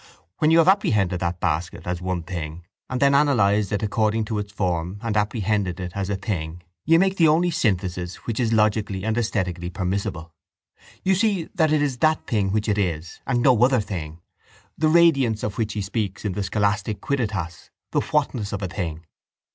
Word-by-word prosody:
When 155 - +3
you 165 - +5
have 165 0 +5
apprehended 105 - +2
that 85 0 -2
basket 85 +2 -2
as 90 0 -3
one 90 -2 -2
thing 85 -1 -6 0.2
and 130 - -2
have 140 0 +4
then - - +1
analysed 110 -8 +3
it 105 +1 -1
according 110 +1 +1
to 110 -1 -2
its 100 0 -5
form 90 -2 -2
and 115 -2 -2
apprehended 105 -3 0
it 90 -1 -4
as 100 -1 -3
a 100 - 0
thing 90 -4 -4 0.2
you 165 +1 +5
make 190 +2 +2
the 165 - +5
only 170 +3 +3
synthesis 95 - -1
which 115 -1 -3
is 115 -3 +1
logically 105 -3 +1
and 110 0 0
esthetically 90 -7 -1
permissible. 90 -3 -3 0.7
You 190 - +3
see 195 -3 +1
that 160 -5 +2
it 150 -1 +3
is 135 -4 -2
that 155 0 +2
thing 105 -6 0
which 105 +2 0
it 105 -1 +1
is 85 -3 -2
and 120 -2 +1
no 125 -4 +5
other 130 0 +4
thing. 85 -6 -5 0.6
The 155 - +1
radiance 140 -10 +4
of 105 +1 -3
which 110 -2 -1
he 105 - -3
speaks 100 -1 -3
in 105 - 0
the 100 - -3
scholastic 100 +1 0
quidditas, 100 - -3 0.2
the - - +2
whatness 130 -8 -1
of 100 0 -3
a - - -1
thing. 85 -3 -5
105 Hz, 195 wpm, -23 LUFS, 90-125 Hz, 0.7 s, you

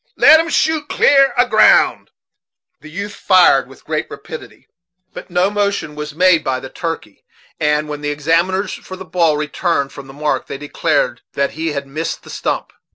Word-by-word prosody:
Let 315 - +7
'em 330 +1 -1
shoot 315 -2 0
clear 275 -1 +4
a 245 +1 +4
ground." 215 -2 +4 0.7
The 155 - -13
youth 200 +5 -6
fired 180 -8 +4
with - - -17
great - - -2
rapidity, - - -10 0.5
but - - -10
no 180 +3 +1
motion 200 -6 -1
was 150 0 -7
made 180 -1 +4
by 130 -1 -1
the 130 - -10
turkey; 165 - -6 0.4
and, 150 0 +1
when 150 -1 -6
the 145 - -2
examiners 165 +6 0
for 185 - -9
the 190 0 -10
ball 165 -5 +1
returned 150 -1 -1
from 140 -1 -11
the 135 - -12
"mark," 150 +2 -2
they - - -6
declared 145 +1 -1
that 140 0 0
he 160 0 -3
had 140 -1 -4
missed 155 +4 -5
the - - -11
stump. - - -3
165 Hz, 180 wpm, -17 LUFS, 150-190 Hz, 0.7 s, Let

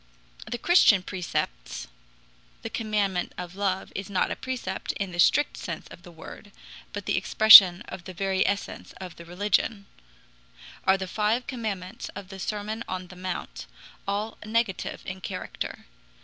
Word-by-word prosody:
The 240 - -3
Christian 230 - +5
precepts 165 - -4 0.8
(the - - -5
commandment 205 -4 -1
of 180 -1 -6
love 195 -1 -1
is 195 0 -5
not 190 -2 0
a - - -1
precept 260 -1 -4
in 195 -2 -4
the 175 - -7
strict 290 +11 +4
sense - - -6
of - - -13
the 175 - -13
word, 170 +5 -12 0.4
but 205 -2 -6
the - - 0
expression 195 -1 +9
of 190 -6 -9
the 185 - -8
very 190 +1 +1
essence 200 +1 -3
of 185 -2 -10
the 170 - -11
religion) 200 +3 0 1.0
are 190 0 +5
the 190 - -4
five 215 +5 0
commandments 205 -7 -5
of 195 -1 -8
the 195 -1 -9
Sermon 215 +3 -3
on 185 -1 -5
the 185 - -11
Mount 185 0 -6 0.4
all 205 +3 -2
negative 220 -3 -1
in 190 0 -6
character. 185 0 -6
195 Hz, 155 wpm, -26 LUFS, 185-210 Hz, 1.0 s, expression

